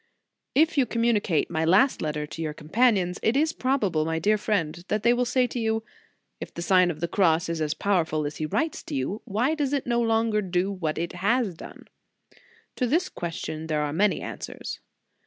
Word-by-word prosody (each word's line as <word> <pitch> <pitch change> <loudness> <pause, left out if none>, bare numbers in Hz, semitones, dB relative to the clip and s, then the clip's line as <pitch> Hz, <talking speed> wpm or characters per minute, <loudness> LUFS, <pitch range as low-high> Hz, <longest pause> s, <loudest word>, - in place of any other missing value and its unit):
IF 315 +1 +4
you 255 - +3
communicate 230 -7 +1
my 160 - 0
last 190 +11 +4
letter 150 -1 -2
to 160 +2 -8
your 155 -2 -3
companions, 185 +2 +1
it 225 +4 +2
is 315 +2 +2
probable, 215 - 0
my 160 +1 -1
dear 205 +6 +3
friend 175 -6 -1
that 210 0 -1
they 240 +1 +5
will 245 +1 +1
say 255 +1 +2
to 245 - -4
you: 220 -1 0 0.6
"If - - -7
the 170 - -6
Sign 180 -1 +4
of 160 -2 -5
the 170 - 0
Cross 170 -2 +2
is 165 -1 -2
as 150 -1 -1
powerful 160 -6 0
as 145 +1 -4
he 155 - -2
writes 315 - -1
to - - -5
you, 140 - -2
why 240 +7 0
does 290 -3 -1
it 280 - 0
no 240 -1 +1
longer 225 -2 +2
do 185 0 0
what 165 -6 -3
it 170 +2 -3
has 205 +3 +1
done?" 160 - -12 0.9
To 250 - +1
this 335 +9 +1
question 160 -2 -5
there 155 -2 0
are 145 -1 -2
many 200 +5 +2
answers. - - -6
195 Hz, 205 wpm, -26 LUFS, 160-235 Hz, 0.9 s, they